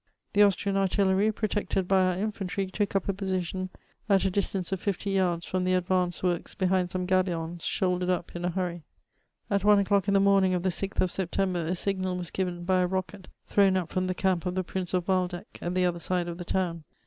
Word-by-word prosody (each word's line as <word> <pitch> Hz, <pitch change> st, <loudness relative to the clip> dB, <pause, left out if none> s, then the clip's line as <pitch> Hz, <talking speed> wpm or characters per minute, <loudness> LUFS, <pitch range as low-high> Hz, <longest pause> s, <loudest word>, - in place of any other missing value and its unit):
The 205 Hz, -, +4 dB
Austrian 200 Hz, 0 st, +3 dB
ardlleiy, 195 Hz, +1 st, +2 dB
protected 205 Hz, -3 st, -1 dB
by 190 Hz, 0 st, +4 dB
our 185 Hz, -1 st, +1 dB
infantry, 195 Hz, -1 st, -2 dB
took 200 Hz, +1 st, -2 dB
up 195 Hz, -, +1 dB
a 200 Hz, -, +1 dB
position 185 Hz, -1 st, -2 dB, 0.4 s
at 195 Hz, -1 st, +4 dB
a 190 Hz, -, +2 dB
distance 195 Hz, -1 st, -1 dB
of 190 Hz, -, -1 dB
fifty 200 Hz, +1 st, -2 dB
yards 180 Hz, -3 st, +1 dB
from 185 Hz, 0 st, -1 dB
the 185 Hz, 0 st, +2 dB
advanced 180 Hz, -1 st, 0 dB
works 175 Hz, -2 st, -1 dB
behind 185 Hz, -1 st, +1 dB
some 180 Hz, 0 st, -2 dB
gabions 175 Hz, -2 st, 0 dB
shouldered 180 Hz, -1 st, 0 dB
up 175 Hz, -1 st, -2 dB
in 175 Hz, -, -4 dB
a 175 Hz, -, +1 dB
hurry. 175 Hz, -1 st, -3 dB, 0.7 s
At 200 Hz, -1 st, +1 dB
one 210 Hz, 0 st, +6 dB
o'clock 200 Hz, -1 st, +2 dB
in 200 Hz, -, +3 dB
the -, -, +6 dB
morning 195 Hz, -2 st, +4 dB
of 180 Hz, -, -2 dB
the 190 Hz, -, +2 dB
6th 195 Hz, +2 st, -1 dB
of 185 Hz, -, +1 dB
September, 185 Hz, -1 st, -1 dB
a 180 Hz, -, 0 dB
signal 185 Hz, -1 st, -1 dB
was 175 Hz, -4 st, -5 dB
^ven 180 Hz, -2 st, -3 dB
by 185 Hz, 0 st, +3 dB
a 180 Hz, -, +2 dB
rocket 190 Hz, +1 st, -4 dB, 0.2 s
thrown 195 Hz, -2 st, +3 dB
up 180 Hz, -3 st, -2 dB
from 185 Hz, -1 st, -1 dB
the 185 Hz, -, -1 dB
camp 185 Hz, -1 st, 0 dB
of 180 Hz, -, -2 dB
the 185 Hz, -, 0 dB
Prince 185 Hz, +1 st, -3 dB
of 180 Hz, -1 st, -1 dB
Waldeck 180 Hz, -2 st, -1 dB
at 175 Hz, +1 st, -3 dB
the 185 Hz, 0 st, +3 dB
other 175 Hz, -1 st, 0 dB
side 180 Hz, 0 st, -1 dB
of 170 Hz, +1 st, -6 dB
the 175 Hz, -, -5 dB
town. 170 Hz, -3 st, -1 dB
185 Hz, 225 wpm, -28 LUFS, 180-195 Hz, 0.7 s, one